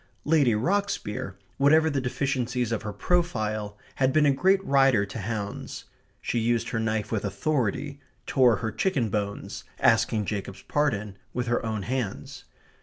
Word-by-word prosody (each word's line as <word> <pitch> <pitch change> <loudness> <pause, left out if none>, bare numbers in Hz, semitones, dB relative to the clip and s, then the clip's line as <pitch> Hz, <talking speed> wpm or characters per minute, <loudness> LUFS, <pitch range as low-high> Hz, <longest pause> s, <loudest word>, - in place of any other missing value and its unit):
Lady 145 -7 +4
Rocksbier, 125 - -1 0.2
whatever 155 +3 +5
the 145 -3 0
deficiencies 125 -2 -1
of 115 - -1
her 105 -1 -4
profile, 110 - -1 0.2
had 130 0 +3
been 155 +1 +4
a 145 - +5
great 190 +6 +2
rider 135 -6 +4
to 105 - -7
hounds. 105 0 -5 0.4
She 120 - 0
used 115 +1 0
her 115 - -1
knife 110 -1 -1
with 110 -3 -1
authority, 135 +6 -1 0.3
tore 125 -4 +4
her 110 +1 -3
chicken 135 - 0
bones, 100 -1 -3 0.2
asking 115 -4 +3
Jacob's 100 -2 -5
pardon, 110 -9 -1 0.2
with 125 0 -1
her 120 0 0
own 110 -3 -2
hands. 120 -2 -4
120 Hz, 150 wpm, -26 LUFS, 105-140 Hz, 0.4 s, whatever